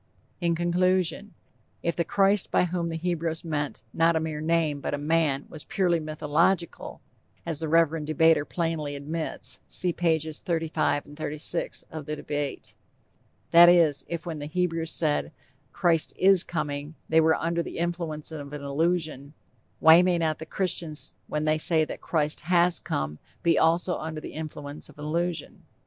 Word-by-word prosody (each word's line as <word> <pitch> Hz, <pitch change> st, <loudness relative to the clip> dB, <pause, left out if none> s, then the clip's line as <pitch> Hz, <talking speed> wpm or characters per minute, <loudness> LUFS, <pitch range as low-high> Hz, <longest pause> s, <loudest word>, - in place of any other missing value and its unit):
_ -, -, -39 dB, 0.4 s
In 170 Hz, -1 st, +1 dB
conclusion: 180 Hz, +3 st, 0 dB, 0.5 s
If 170 Hz, -, 0 dB
the 170 Hz, -, +1 dB
'Christ' 195 Hz, +3 st, +2 dB
by -, -, +3 dB
whom 175 Hz, -1 st, -2 dB
the 165 Hz, -, -4 dB
Hebrews 165 Hz, -1 st, -2 dB
meant, 145 Hz, -3 st, -3 dB
not 165 Hz, +1 st, +3 dB
a -, -, +2 dB
mere 155 Hz, -1 st, -4 dB
name, 160 Hz, -3 st, +1 dB
but -, -, -2 dB
a -, -, -5 dB
man, 150 Hz, -2 st, +1 dB
was 155 Hz, -, -9 dB
"purely 180 Hz, -4 st, +1 dB
mythological," 155 Hz, +3 st, -1 dB, 0.4 s
as 165 Hz, -3 st, -3 dB
the 160 Hz, -, -2 dB
reverend 165 Hz, -1 st, +2 dB
debater 155 Hz, 0 st, +4 dB
plainly 160 Hz, -3 st, -3 dB
admits 155 Hz, +3 st, -3 dB
(see 180 Hz, -1 st, +2 dB
pages 160 Hz, -3 st, 0 dB
35, 160 Hz, -3 st, -1 dB
36 155 Hz, +2 st, 0 dB
of 155 Hz, -3 st, -7 dB
The 150 Hz, -, -2 dB
Debate) 145 Hz, -2 st, -4 dB, 0.8 s
that 170 Hz, +1 st, +9 dB
is, 165 Hz, -5 st, +4 dB
if 170 Hz, 0 st, -5 dB
when 165 Hz, -3 st, -5 dB
the 145 Hz, -, -5 dB
Hebrews 165 Hz, -1 st, -1 dB
said: 155 Hz, -3 st, -1 dB, 0.4 s
"Christ 165 Hz, -2 st, +1 dB
is 190 Hz, -1 st, +5 dB
coming," 145 Hz, -2 st, -4 dB
they 160 Hz, 0 st, +4 dB
were 160 Hz, 0 st, +4 dB
under 170 Hz, +1 st, -1 dB
the -, -, -7 dB
influence 170 Hz, -3 st, -3 dB
of 145 Hz, -2 st, -7 dB
an 145 Hz, -1 st, -6 dB
illusion, 155 Hz, -1 st, -1 dB, 0.4 s
why 160 Hz, +2 st, +8 dB
may 180 Hz, -1 st, +2 dB
not 160 Hz, -2 st, -1 dB
the 160 Hz, -, -8 dB
Christians 165 Hz, -5 st, -2 dB
when 150 Hz, 0 st, -2 dB
they 155 Hz, 0 st, +2 dB
say 160 Hz, 0 st, +3 dB
that -, -, -8 dB
'Christ' 150 Hz, -2 st, 0 dB
has 175 Hz, 0 st, +4 dB
come, 75 Hz, +1 st, -3 dB, 0.2 s
be 170 Hz, -2 st, +3 dB
also 170 Hz, +2 st, +2 dB
under 155 Hz, 0 st, -5 dB
the -, -, -9 dB
influence 150 Hz, -2 st, -7 dB
of 150 Hz, -, -17 dB
an 150 Hz, -, -7 dB
illusion? 170 Hz, +1 st, -3 dB
160 Hz, 165 wpm, -26 LUFS, 150-170 Hz, 0.8 s, that